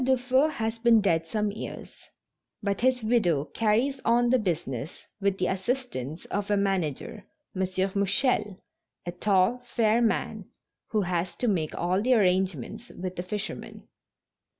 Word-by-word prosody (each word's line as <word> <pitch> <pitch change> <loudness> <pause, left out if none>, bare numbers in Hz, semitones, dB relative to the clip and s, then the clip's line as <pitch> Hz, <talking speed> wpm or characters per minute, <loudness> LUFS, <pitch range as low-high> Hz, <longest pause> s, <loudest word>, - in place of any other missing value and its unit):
Dufeu 260 +2 +3
has 225 -5 -3
been 230 -1 +5
dead 165 -5 +1
some 210 +3 -1
years, 210 - -7 0.7
but 200 0 -1
his 250 -1 +2
widow 185 - +2
carries 230 - +1
on 240 +1 +3
the 255 - +4
business 160 - -3
with 200 -1 +1
the 180 - 0
assistance 190 - -3
of 205 0 -3
a 205 - +3
manager, 195 - -1 0.3
M. 190 - -2 0.3
Mouchel, 200 0 +1 0.5
a 175 - -3
tall, 195 +5 +2
fair 230 -1 +2
man 230 - 0 0.4
who 215 -2 0
has 180 -1 -2
to 245 - -1
make 170 -8 0
all 180 +3 0
the 255 +3 +3
arrangements 185 - 0
with 185 0 -6
the 175 - -3
fishermen. 205 +3 -6
205 Hz, 145 wpm, -27 LUFS, 180-235 Hz, 0.7 s, been